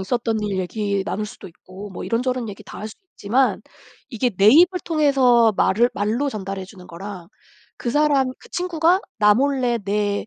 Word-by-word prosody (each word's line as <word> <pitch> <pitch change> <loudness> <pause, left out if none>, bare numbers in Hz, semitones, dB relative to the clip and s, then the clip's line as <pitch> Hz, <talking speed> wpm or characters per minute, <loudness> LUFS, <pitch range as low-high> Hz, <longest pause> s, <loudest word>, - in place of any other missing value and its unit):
있었던 225 +2 -1
일 205 -2 -2
얘기 200 +1 -2
나눌 210 +1 -3
수도 - - -11
있고 185 +4 -12
뭐 190 - -7
이런저런 250 0 -1
얘기 195 - -9
다 - - -11
할 215 - -6
수 - - -13 0.2
있지만 245 +6 0 0.5
이게 245 0 0
내 200 -1 +1
입을 355 +7 +5
통해서 265 -8 +3
말을 235 +5 +3
말로 225 +8 -1
전달해 195 -4 -5
주는 185 -2 -14
거랑 180 0 -9 0.5
그 240 - -3
사람 285 -1 +2
그 470 - -17
친구가 355 0 +1 0.2
나 210 -1 +5
몰래 255 -2 +1
내 205 0 -2
225 Hz, 320 characters per minute, -21 LUFS, 200-265 Hz, 0.5 s, 입을